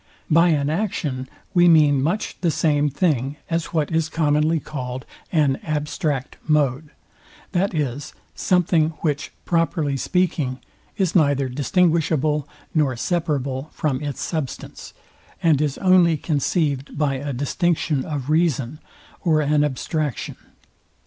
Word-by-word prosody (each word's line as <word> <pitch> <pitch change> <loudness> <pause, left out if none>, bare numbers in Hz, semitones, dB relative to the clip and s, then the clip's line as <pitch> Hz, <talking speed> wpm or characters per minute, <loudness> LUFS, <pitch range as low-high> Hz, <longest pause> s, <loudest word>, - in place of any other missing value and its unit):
By 165 +3 +6
an 145 -4 +2
action 155 -8 -2 0.2
we 175 -1 +5
mean 150 -5 +5
much 170 +10 -1
the 175 - +2
same 150 -2 +2
thing, 140 -2 0
as 165 0 0
what 155 -2 -1
is 160 -1 +1
commonly 155 0 +2
called 130 -4 -6 0.3
an 145 -5 +2
abstract 150 -2 -3
mode; 150 -1 +1 0.6
that 190 0 0
is, 145 -2 -3 0.2
something, 165 -3 +2
which, 150 -2 -1
properly 165 -4 +1
speaking, 150 -6 0 0.4
is 190 -4 +1
neither 140 -5 +3
distinguishable, 150 +1 +1 0.2
nor 145 -5 +2
separable 145 -2 -2
from 135 -4 -1
its 145 -2 -4
substance, 155 -6 -5 0.5
and 155 -4 +4
is 150 -2 -1
only 180 -4 +4
conceived 145 -2 -1
by 140 -3 +1
a 140 +2 -4
distinction 145 +1 0
of 145 -2 -4
reason, 155 -4 +1 0.4
or 160 -4 +3
an 150 0 +2
abstraction. 150 - -2
150 Hz, 125 wpm, -22 LUFS, 140-165 Hz, 0.6 s, By